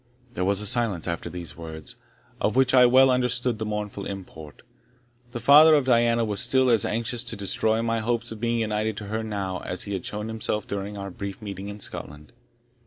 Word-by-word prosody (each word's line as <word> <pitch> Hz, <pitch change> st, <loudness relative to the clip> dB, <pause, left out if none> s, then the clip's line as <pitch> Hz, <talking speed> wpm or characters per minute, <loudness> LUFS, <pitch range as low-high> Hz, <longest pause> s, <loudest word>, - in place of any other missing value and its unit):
There 90 Hz, -, -2 dB
was 100 Hz, +1 st, +2 dB
a -, -, -3 dB
silence 110 Hz, -7 st, 0 dB
after 85 Hz, -2 st, -3 dB
these 85 Hz, -3 st, -8 dB
words, 80 Hz, -2 st, -9 dB, 0.4 s
of 105 Hz, -, 0 dB
which 130 Hz, 0 st, +3 dB
I 125 Hz, -1 st, +7 dB
well 130 Hz, +1 st, +6 dB
understood 125 Hz, -2 st, 0 dB
the 110 Hz, -, -3 dB
mournful 105 Hz, -1 st, -4 dB
import. 85 Hz, -6 st, -9 dB, 0.7 s
The 120 Hz, -, -6 dB
father 155 Hz, +4 st, +7 dB
of 145 Hz, -3 st, +2 dB
Diana 120 Hz, -2 st, +3 dB
was 105 Hz, -2 st, +1 dB
still 130 Hz, -1 st, +3 dB
as 115 Hz, -4 st, +3 dB
anxious 115 Hz, +1 st, -1 dB
to -, -, -4 dB
destroy 110 Hz, +3 st, 0 dB
my 115 Hz, 0 st, 0 dB
hopes 120 Hz, +1 st, -2 dB
of 110 Hz, -, -7 dB
being 115 Hz, 0 st, 0 dB
united 110 Hz, -1 st, -1 dB
to 105 Hz, -3 st, -6 dB
her 110 Hz, +1 st, -2 dB
now 100 Hz, -4 st, -4 dB
as 90 Hz, -, -4 dB
he 100 Hz, -, -5 dB
had 95 Hz, -, -3 dB
shown 105 Hz, +1 st, -3 dB
himself 110 Hz, -1 st, -3 dB
during 100 Hz, +1 st, -5 dB
our 100 Hz, -1 st, -6 dB
brief 100 Hz, +1 st, -7 dB
meeting 100 Hz, -2 st, -7 dB
in 105 Hz, +1 st, -8 dB
Scotland. 75 Hz, -3 st, -8 dB
110 Hz, 205 wpm, -25 LUFS, 100-120 Hz, 0.7 s, I